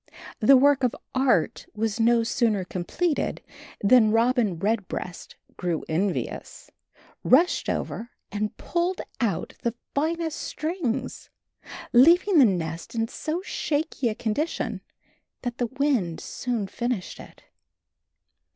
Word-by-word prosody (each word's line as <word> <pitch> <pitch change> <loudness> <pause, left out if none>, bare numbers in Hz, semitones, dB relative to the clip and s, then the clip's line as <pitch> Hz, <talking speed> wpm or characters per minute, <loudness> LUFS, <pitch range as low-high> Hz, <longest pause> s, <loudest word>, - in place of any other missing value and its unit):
The 260 +4 +7
work 280 +1 +4
of 245 - +2 0.2
art 255 - +1
was 220 +1 -1
no 230 0 +4
sooner 225 -4 +1
completed 275 - -2 0.4
than 220 +1 +6
Robin 225 -4 +2
Redbreast 195 -2 -3 0.2
grew 175 -3 -2
envious, 180 +4 -3 0.5
rushed 320 +8 +4
over 235 - -3 0.2
and 210 +1 -3
pulled 350 +2 -1 0.2
out 215 -8 -1
the 235 -1 -1 0.2
finest 320 +2 -1
strings, 310 -6 -3 0.6
leaving 335 +8 +6
the 270 - +8
nest 170 -2 -2
in 225 0 0
so 330 +4 -3
shaky 295 -8 -1
a 215 - -3
condition 260 +11 -2 0.6
that 245 -1 -4
the 245 - +1
wind 255 - 0
soon 240 -5 -3
finished 235 -1 -3
it. - - -13
240 Hz, 115 wpm, -25 LUFS, 210-285 Hz, 0.6 s, the